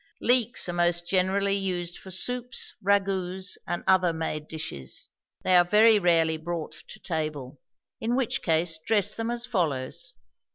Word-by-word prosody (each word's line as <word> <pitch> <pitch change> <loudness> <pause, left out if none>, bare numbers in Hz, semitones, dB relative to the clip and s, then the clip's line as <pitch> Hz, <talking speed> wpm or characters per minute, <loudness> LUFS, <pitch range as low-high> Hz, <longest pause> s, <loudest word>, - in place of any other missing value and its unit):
Leeks 245 -3 +3
are 175 - -3
most 175 0 +1
generally 195 +2 +2
used 180 -3 -2
for 190 - -12
soups, 245 +6 -1
ragouts, 190 -1 0
and 175 - -3
other 185 -2 +4
made 160 -2 -4
dishes. 155 - -6 0.3
They 185 - +3
are 175 - +7
very 215 +4 +5
rarely 165 -3 +3
brought 165 0 -5 0.2
to - - -11
table; 150 -5 -4 0.4
in 235 +2 -1
which 260 -3 0
case 160 -1 +1
dress 210 -1 +1
them 225 0 -3
as 240 0 -1
follows. 180 - -2
180 Hz, 150 wpm, -26 LUFS, 165-205 Hz, 0.4 s, are